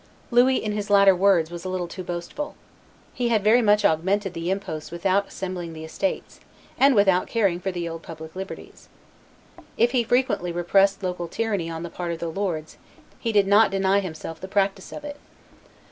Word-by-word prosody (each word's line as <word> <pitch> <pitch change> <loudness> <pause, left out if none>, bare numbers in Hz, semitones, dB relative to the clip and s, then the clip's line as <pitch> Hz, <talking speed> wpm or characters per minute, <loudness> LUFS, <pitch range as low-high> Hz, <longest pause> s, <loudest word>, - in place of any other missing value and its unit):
Louis, 250 +2 +5
in 215 - -1
his 210 0 -3
latter 200 -1 +6
words, 180 -3 +3
was 175 0 -7
a 185 - -4
little 185 -1 -2
too 185 +2 -7
boastful. 175 +12 -5 0.6
He 245 -1 -1
had 220 -4 +2
very 225 +4 +5
much 210 -2 +3
augmented 190 +4 +1
the 165 +1 -4
imposts 175 -5 -4
without 190 +4 0
assembling 180 -3 -5
the 160 0 -8
estates, 220 - -3 0.4
and 275 -1 +4
without 195 -3 +3
caring 200 -7 +1
for 190 +1 -3
the 175 -2 -4
old 165 0 -6
public 160 0 -10
liberties. 190 +1 -9 0.9
If 235 +2 +3
he 250 -3 +2
frequently 230 -7 +1
repressed 195 +3 +2
local 180 -2 -3
tyranny 200 -5 -2
on 165 0 -5
the 170 - -6
part 175 -1 -4
of 170 - -3
the 170 0 -4
lords, 165 -4 -3 0.4
he 230 - -1
did 205 -2 +4
not 205 +2 +5
deny 195 0 +2
himself 165 -3 -7
the 190 - -6
practice 195 -1 -1
of 300 - -8
it. 290 -1 -7
190 Hz, 190 wpm, -24 LUFS, 170-205 Hz, 0.9 s, latter